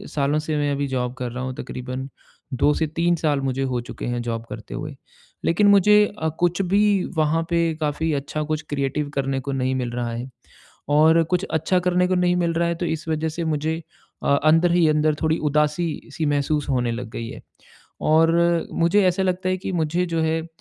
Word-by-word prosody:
सालों 145 Hz, +1 st, +1 dB
से 155 Hz, 0 st, -2 dB
मैं 145 Hz, -1 st, 0 dB
अभी 140 Hz, 0 st, -1 dB
जॉब 125 Hz, -2 st, -2 dB
कर 125 Hz, -2 st, -4 dB
रहा 125 Hz, +2 st, -5 dB
हूँ, 130 Hz, 0 st, -3 dB
तकरीबन 130 Hz, +2 st, -6 dB, 0.4 s
2 145 Hz, +4 st, +3 dB
से 160 Hz, -, 0 dB
3 170 Hz, +3 st, +1 dB
साल 150 Hz, -4 st, 0 dB
मुझे 135 Hz, 0 st, -2 dB
हो 125 Hz, -2 st, -1 dB
चुके 120 Hz, -, -8 dB
हैं 120 Hz, 0 st, -2 dB
जॉब 115 Hz, -1 st, -4 dB
करते -, -, -8 dB
हुए। -, -, -5 dB, 0.5 s
लेकिन 205 Hz, +5 st, +3 dB
मुझे 210 Hz, +1 st, +6 dB
अ, 160 Hz, -, 0 dB
कुछ 175 Hz, +1 st, +1 dB
भी 195 Hz, +3 st, +2 dB, 0.3 s
वहाँ 155 Hz, +1 st, +2 dB
पे 170 Hz, -1 st, +1 dB
काफ़ी 155 Hz, +2 st, 0 dB
अच्छा 145 Hz, +2 st, -3 dB
कुछ 155 Hz, 0 st, -2 dB
क्रिएटिव 145 Hz, +1 st, -2 dB
करने 135 Hz, -1 st, -1 dB
को 140 Hz, +1 st, -5 dB
नहीं 130 Hz, -1 st, 0 dB
मिल 125 Hz, -2 st, -2 dB
रहा 120 Hz, 0 st, -3 dB
है 120 Hz, +3 st, -5 dB, 0.6 s
और 160 Hz, +3 st, +5 dB
कुछ 170 Hz, +3 st, -1 dB
अच्छा 170 Hz, +3 st, +1 dB
करने 180 Hz, 0 st, +2 dB
को 185 Hz, -, +1 dB
नहीं 180 Hz, 0 st, +2 dB
मिल 170 Hz, -1 st, +1 dB
रहा 170 Hz, +1 st, +1 dB
है, 170 Hz, -, -1 dB
तो 175 Hz, +1 st, -3 dB
इस 160 Hz, 0 st, -3 dB
वजह 160 Hz, 0 st, 0 dB
से 170 Hz, +2 st, -4 dB
मुझे 160 Hz, +1 st, -1 dB, 0.4 s
अ, 140 Hz, -, +3 dB
अंदर 165 Hz, +3 st, +4 dB
ही 175 Hz, -2 st, +4 dB
अंदर 150 Hz, 0 st, +2 dB
थोड़ी 160 Hz, 0 st, +2 dB
उदासी-सी 150 Hz, +2 st, -1 dB
महसूस 145 Hz, 0 st, 0 dB
होने 125 Hz, -3 st, +1 dB
लग 120 Hz, 0 st, -6 dB
गई 115 Hz, -, -5 dB
है, -, -, -9 dB, 0.6 s
और 165 Hz, +2 st, +3 dB
मुझे 170 Hz, +5 st, +4 dB
ऐसा 185 Hz, +1 st, +1 dB
लगता 185 Hz, 0 st, 0 dB
है 185 Hz, -, 0 dB
कि 190 Hz, -, -5 dB
मुझे 170 Hz, +1 st, 0 dB
जो 165 Hz, -1 st, -1 dB
है 160 Hz, 0 st, 0 dB
अ, 165 Hz, -, -10 dB
155 Hz, 210 wpm, -23 LUFS, 140-170 Hz, 0.6 s, मुझे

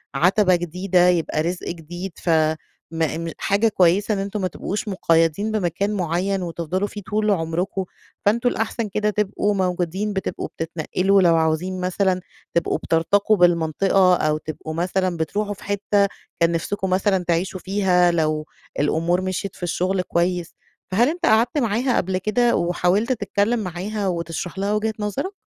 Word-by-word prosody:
عتبة 180 Hz, +5 st, +4 dB
جديدة 180 Hz, +1 st, +1 dB
يبقى 165 Hz, -3 st, +1 dB
رزق 175 Hz, +2 st, -3 dB
جديد 175 Hz, +3 st, -6 dB
ف 175 Hz, -, -5 dB, 0.6 s
م 165 Hz, 0 st, -1 dB, 0.2 s
م 165 Hz, -, -4 dB
حاجة 200 Hz, +3 st, +2 dB
كويّسة 195 Hz, +2 st, +3 dB
إن 200 Hz, -, -1 dB
أنتم 200 Hz, +1 st, -3 dB
ما 185 Hz, -, +1 dB
تبقوش 200 Hz, +4 st, -4 dB
مقيدين 165 Hz, +2 st, +1 dB
بمكان 200 Hz, 0 st, -1 dB
معيّن 185 Hz, +1 st, -1 dB
وتفضلوا 175 Hz, +3 st, -2 dB
فيه 205 Hz, -, -8 dB
طول 210 Hz, +2 st, 0 dB
عمركم. 180 Hz, +2 st, -1 dB, 0.4 s
فأنتم 235 Hz, +4 st, +3 dB
الأحسن 225 Hz, -1 st, -2 dB
كده 210 Hz, +2 st, 0 dB
تبقوا 210 Hz, 0 st, 0 dB
موجودين 185 Hz, +2 st, -1 dB
بتبقوا 195 Hz, -, -3 dB
بتتنقلوا، 180 Hz, +4 st, 0 dB
لو 170 Hz, -2 st, +5 dB
عاوزين 165 Hz, +4 st, 0 dB
مثلًا 185 Hz, 0 st, 0 dB, 0.3 s
تبقوا 170 Hz, -, +1 dB
بترتقوا 200 Hz, +6 st, +2 dB
بالمنطقة 175 Hz, +2 st, +3 dB
أو 155 Hz, -2 st, +1 dB
تبقوا 155 Hz, 0 st, -7 dB
مثلًا 180 Hz, +1 st, -1 dB
بتروحوا 205 Hz, +6 st, -2 dB
في 195 Hz, -, -14 dB
حتّة 200 Hz, 0 st, +1 dB, 0.3 s
كان 170 Hz, 0 st, +3 dB
نفسكم 190 Hz, +3 st, -2 dB
مثلًا 190 Hz, 0 st, +1 dB
تعيشوا 180 Hz, +2 st, 0 dB
فيها 185 Hz, -2 st, +2 dB
لو 155 Hz, -2 st, 0 dB, 0.3 s
الأمور 165 Hz, +5 st, +1 dB
مشيت 185 Hz, +1 st, -3 dB
في -, -, -12 dB
الشغل 185 Hz, +2 st, 0 dB
كويّس. 175 Hz, -1 st, -1 dB, 0.4 s
فهل 235 Hz, +8 st, +3 dB
أنتَ 345 Hz, +2 st, -2 dB
قعدت 225 Hz, +6 st, +3 dB
معاها 245 Hz, 0 st, +1 dB
قبل 185 Hz, +1 st, 0 dB
كده، 235 Hz, +5 st, +2 dB
وحاولت 180 Hz, +7 st, +1 dB
تتكلّم 225 Hz, -1 st, 0 dB
معاها 200 Hz, +2 st, -3 dB
وتشرح 170 Hz, +1 st, -3 dB
لها 200 Hz, +2 st, 0 dB
وجهة 215 Hz, +1 st, 0 dB
نظرَك؟ 210 Hz, -, -3 dB
185 Hz, 150 wpm, -22 LUFS, 170-205 Hz, 0.6 s, لو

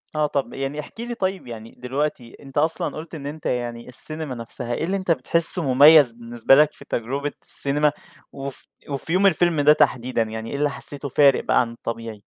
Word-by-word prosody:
آه، 150 Hz, -1 st, +1 dB
طَب 140 Hz, -1 st, -3 dB
يعني 135 Hz, +2 st, -4 dB
احكِ 150 Hz, -, -10 dB
لي 240 Hz, 0 st, -5 dB
طيّب 190 Hz, -, -3 dB
يعني 115 Hz, -1 st, -10 dB
دلوقتي 125 Hz, -1 st, -4 dB
أنت 135 Hz, 0 st, -11 dB
أصلًا 160 Hz, +2 st, 0 dB
قُلت 160 Hz, +2 st, -8 dB
إن 140 Hz, -, -8 dB
أنت 150 Hz, +1 st, -8 dB
يعني 120 Hz, -1 st, -3 dB
السينما 155 Hz, +1 st, -2 dB
نَفْسها، 120 Hz, +1 st, -2 dB
إيه 135 Hz, -, -3 dB
اللي 190 Hz, +3 st, -1 dB
أنت 185 Hz, -3 st, -1 dB
بتحسه 165 Hz, +5 st, 0 dB
مُمَيزْ 145 Hz, -1 st, +7 dB
بالنسبة 120 Hz, +2 st, +2 dB
لَك 150 Hz, +1 st, +5 dB
في -, -, -15 dB
تَجرُبة 140 Hz, +5 st, -3 dB
السينما؟ 145 Hz, +2 st, +2 dB, 0.4 s
وف 140 Hz, -1 st, -7 dB, 0.2 s
وفي 140 Hz, +4 st, -3 dB
يوم 195 Hz, +2 st, +4 dB
الفيلم 170 Hz, -3 st, +2 dB
ده 150 Hz, +1 st, +6 dB
تحديدًا، 125 Hz, -4 st, +1 dB
يعني 110 Hz, 0 st, -4 dB
إيه 140 Hz, -, -3 dB
اللي 145 Hz, +1 st, +1 dB
حسيته 140 Hz, 0 st, +1 dB
فارق 140 Hz, 0 st, +4 dB
بقى -, -, +3 dB
عن 115 Hz, -1 st, -3 dB
الطبيعي؟ 115 Hz, -2 st, -7 dB
140 Hz, 195 wpm, -22 LUFS, 120-155 Hz, 0.4 s, مُمَيزْ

